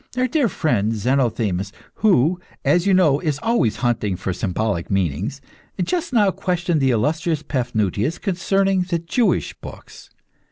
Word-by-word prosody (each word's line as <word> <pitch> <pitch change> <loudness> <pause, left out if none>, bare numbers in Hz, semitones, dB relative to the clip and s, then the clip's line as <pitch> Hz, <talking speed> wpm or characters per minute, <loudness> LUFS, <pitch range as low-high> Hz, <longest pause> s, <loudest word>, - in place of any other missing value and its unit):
Our 255 0 +2
dear 255 -2 +1
friend, 115 - 0
Zenothemis, 110 -5 0 0.3
who, 180 - +3 0.3
as 175 +2 +3
you 195 - +4
know, 155 -7 +4
is 150 -4 -1
always 225 - +1
hunting 110 -5 0
for 95 +1 -3
symbolic 95 -1 -2
meanings, 95 - -1 0.4
just 345 - -2
now 210 -6 +3
questioned 175 -4 -1
the 135 - +3
illustrious 155 +7 0
Paphnutius 120 - -1
concerning 195 0 +1
the 180 -1 -1
Jewish 170 +8 0
books. - - -11
150 Hz, 135 wpm, -21 LUFS, -, 0.4 s, you